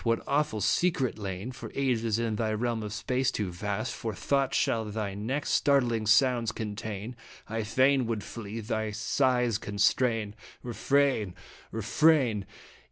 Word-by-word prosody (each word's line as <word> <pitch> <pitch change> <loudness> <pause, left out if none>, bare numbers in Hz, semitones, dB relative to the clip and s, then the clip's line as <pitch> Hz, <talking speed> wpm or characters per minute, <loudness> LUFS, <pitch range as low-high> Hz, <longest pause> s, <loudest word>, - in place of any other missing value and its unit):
What 115 -1 +1
awful 140 -6 0
secret 135 - +1
(lain 100 +4 -4
For 125 - -9
ages 115 -5 +1
in 115 -2 -1
thy 110 -1 0
realm 115 +1 -1
of 105 -1 -5
space, 125 +4 0
too 105 -8 -2
vast 85 - -3
For - - -4
thought) 140 -2 0
shall 115 -1 +1
thy 105 -1 -3
next 120 +9 -2
startling 120 -6 +2
sounds 120 0 +4
contain? 110 +1 -5 0.3
I 115 +1 -2
fain 130 +3 +3
would 110 -3 -2
flee 110 0 -6
thy 110 0 -2
sighs 120 +1 +1
constrain. 105 +2 +1 0.3
Refrain! 125 -5 +1 0.4
Refrain 115 -1 +2
115 Hz, 140 wpm, -29 LUFS, 105-130 Hz, 0.4 s, sounds